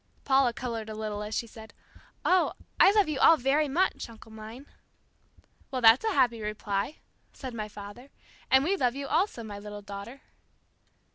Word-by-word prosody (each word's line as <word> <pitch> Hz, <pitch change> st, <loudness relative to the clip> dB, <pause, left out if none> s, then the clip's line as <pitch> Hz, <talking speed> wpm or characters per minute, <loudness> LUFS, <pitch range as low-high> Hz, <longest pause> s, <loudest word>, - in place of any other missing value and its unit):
Paula 265 Hz, -2 st, +4 dB
colored 230 Hz, -2 st, -5 dB
a 215 Hz, -, -6 dB
little 215 Hz, -1 st, -4 dB
as 210 Hz, +1 st, -4 dB
she -, -, -1 dB
said, 220 Hz, -1 st, -13 dB, 0.5 s
"Oh, 365 Hz, 0 st, +3 dB, 0.3 s
I -, -, +8 dB
love 415 Hz, -3 st, +3 dB
you 300 Hz, -3 st, -2 dB
all 325 Hz, +3 st, +7 dB
very 285 Hz, +4 st, +2 dB
much, 330 Hz, -1 st, 0 dB
uncle 225 Hz, -1 st, -14 dB
mine." 220 Hz, +5 st, -10 dB, 1.0 s
"Well, 260 Hz, -, -2 dB
that's 230 Hz, +1 st, +6 dB
a 440 Hz, -2 st, 0 dB
happy 235 Hz, -7 st, +2 dB
reply," 210 Hz, +4 st, -3 dB, 0.4 s
said 260 Hz, -3 st, -7 dB
my 215 Hz, -2 st, -4 dB
father, 205 Hz, +6 st, -10 dB, 0.4 s
"and 265 Hz, +1 st, +5 dB
we 370 Hz, +6 st, +1 dB
love 250 Hz, -8 st, 0 dB
you 280 Hz, 0 st, -4 dB
also, 320 Hz, -, 0 dB
my 205 Hz, -2 st, -7 dB
little 205 Hz, 0 st, -9 dB
daughter." 205 Hz, +6 st, -9 dB
235 Hz, 170 wpm, -28 LUFS, 215-275 Hz, 1.0 s, I